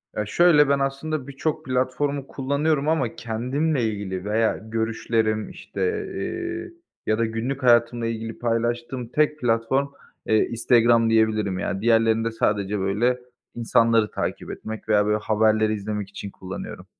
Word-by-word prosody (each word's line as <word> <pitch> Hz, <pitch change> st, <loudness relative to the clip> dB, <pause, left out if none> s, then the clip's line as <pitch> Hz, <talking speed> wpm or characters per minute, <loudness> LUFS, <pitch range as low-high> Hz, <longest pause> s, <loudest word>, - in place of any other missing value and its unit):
Ya, 105 Hz, -, -1 dB
şöyle, 150 Hz, +4 st, +5 dB
ben 140 Hz, 0 st, +3 dB
aslında 140 Hz, +1 st, -2 dB
birçok 140 Hz, +2 st, -3 dB
platformu 130 Hz, +2 st, -1 dB
kullanıyorum 140 Hz, +2 st, 0 dB
ama 150 Hz, -7 st, 0 dB
kendimle 125 Hz, +5 st, -1 dB
ilgili 95 Hz, -3 st, -5 dB
veya 110 Hz, +2 st, +1 dB
görüşlerim 110 Hz, -1 st, -1 dB
işte, -, -, -8 dB, 0.3 s
eee, 350 Hz, -1 st, -4 dB, 0.3 s
ya 110 Hz, -, +1 dB
da 115 Hz, -, +1 dB
günlük 120 Hz, +5 st, -3 dB
hayatımla 120 Hz, -1 st, +3 dB
ilgili 115 Hz, 0 st, -4 dB
paylaştığım 120 Hz, +1 st, -1 dB
tek 150 Hz, +4 st, +1 dB
platform, 120 Hz, +3 st, +1 dB, 0.4 s
eee, 110 Hz, -, +4 dB
Instagram 115 Hz, 0 st, +3 dB
diyebilirim, 110 Hz, -4 st, +2 dB
yani. 95 Hz, +2 st, -2 dB
Diğerlerinde 115 Hz, 0 st, +3 dB
sadece, 105 Hz, -2 st, 0 dB
böyle, 110 Hz, +6 st, +1 dB, 0.4 s
insanları 115 Hz, -1 st, +2 dB
takip -, -, -4 dB
etmek 110 Hz, 0 st, -7 dB
veya, 105 Hz, -1 st, +4 dB
böyle, 105 Hz, 0 st, +2 dB
haberleri 110 Hz, 0 st, +2 dB
izlemek 105 Hz, -1 st, -4 dB
için 100 Hz, 0 st, -7 dB
kullanıyorum. 95 Hz, 0 st, -8 dB
115 Hz, 135 wpm, -24 LUFS, 110-135 Hz, 0.4 s, şöyle